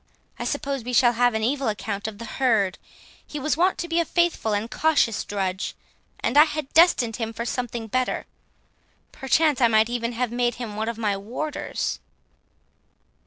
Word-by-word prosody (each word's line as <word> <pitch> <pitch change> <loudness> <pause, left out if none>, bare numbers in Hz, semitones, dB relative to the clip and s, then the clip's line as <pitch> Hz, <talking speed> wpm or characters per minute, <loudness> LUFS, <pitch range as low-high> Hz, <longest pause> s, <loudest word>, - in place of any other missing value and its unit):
I - - -3
suppose 275 -4 -2
we 250 +2 -5
shall 240 0 +5
have 245 0 +2
an 220 - -1
evil 270 +3 0
account 210 -1 -3
of 215 -2 -7
the 230 - -7
herd; 220 -6 +1 0.4
he 295 - -7
was 305 +3 0
wont 360 +4 +2
to 345 - -3
be 335 0 +1
a - - +3
faithful 340 -9 0
and 205 +1 0
cautious 285 -8 +2
drudge, 190 -2 -3 0.5
and 275 +5 +3
I 300 - +9
had 305 -3 -5
destined 290 -10 +4
him 225 -1 -3
for 230 +1 -4
something 240 -2 -3
better; 255 +3 -1 0.9
perchance 295 +1 +2
I 240 - +7
might 220 +1 +3
even 240 0 -2
have 240 0 -1
made 240 -1 0
him 230 -4 -6
one 220 +2 -2
of 230 - -5
my 210 -3 0
warders." 250 +10 -4
240 Hz, 180 wpm, -24 LUFS, 220-280 Hz, 0.9 s, I